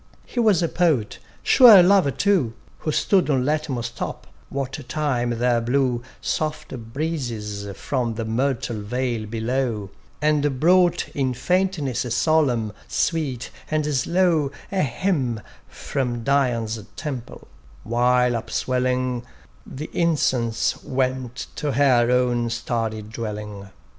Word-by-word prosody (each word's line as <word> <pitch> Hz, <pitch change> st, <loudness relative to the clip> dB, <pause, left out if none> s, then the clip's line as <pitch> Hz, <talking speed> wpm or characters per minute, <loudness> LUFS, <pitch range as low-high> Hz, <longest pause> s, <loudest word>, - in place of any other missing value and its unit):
He 245 Hz, -, -5 dB
was 210 Hz, -7 st, +4 dB
a -, -, +2 dB
Poet, 155 Hz, -12 st, +1 dB, 0.2 s
sure 235 Hz, -, +9 dB
a 180 Hz, -, +8 dB
lover 190 Hz, -4 st, +5 dB
too, 155 Hz, -, +1 dB, 0.2 s
Who 155 Hz, -, -2 dB
stood 185 Hz, +3 st, +2 dB
on 130 Hz, -3 st, +2 dB
Latmus' 140 Hz, -6 st, -1 dB
top, -, -, -5 dB, 0.2 s
what 135 Hz, 0 st, -4 dB
time 135 Hz, -6 st, 0 dB
there 120 Hz, 0 st, +2 dB
blew 125 Hz, 0 st, +1 dB, 0.2 s
Soft 155 Hz, -1 st, -2 dB, 0.2 s
breezes 115 Hz, -9 st, -3 dB
from 120 Hz, -5 st, -2 dB
the 115 Hz, 0 st, -3 dB
myrtle 120 Hz, -1 st, -1 dB
vale 120 Hz, 0 st, -2 dB
below; 115 Hz, -2 st, -2 dB, 0.3 s
And 145 Hz, -3 st, +1 dB
brought 175 Hz, +2 st, +4 dB
in 130 Hz, -3 st, -1 dB
faintness 175 Hz, -3 st, 0 dB, 0.2 s
solemn, 125 Hz, -8 st, +2 dB
sweet, 145 Hz, -8 st, -1 dB, 0.2 s
and 155 Hz, -1 st, 0 dB
slow 160 Hz, +1 st, +2 dB, 0.2 s
A 195 Hz, -1 st, +1 dB
hymn 135 Hz, -, 0 dB, 0.3 s
from 120 Hz, -4 st, -3 dB
Dian's 120 Hz, -5 st, +1 dB, 0.2 s
temple; 135 Hz, -7 st, -6 dB, 0.4 s
while 125 Hz, +2 st, +2 dB
upswelling, 125 Hz, +1 st, -1 dB, 0.4 s
The 150 Hz, +4 st, -7 dB
incence 130 Hz, -9 st, +1 dB
went 130 Hz, -2 st, -2 dB
to 145 Hz, -2 st, -1 dB
her 125 Hz, -3 st, +4 dB
own 125 Hz, -1 st, +2 dB
starry 115 Hz, -2 st, -2 dB
dwelling. 105 Hz, -2 st, -6 dB
130 Hz, 120 wpm, -23 LUFS, 115-150 Hz, 0.4 s, sure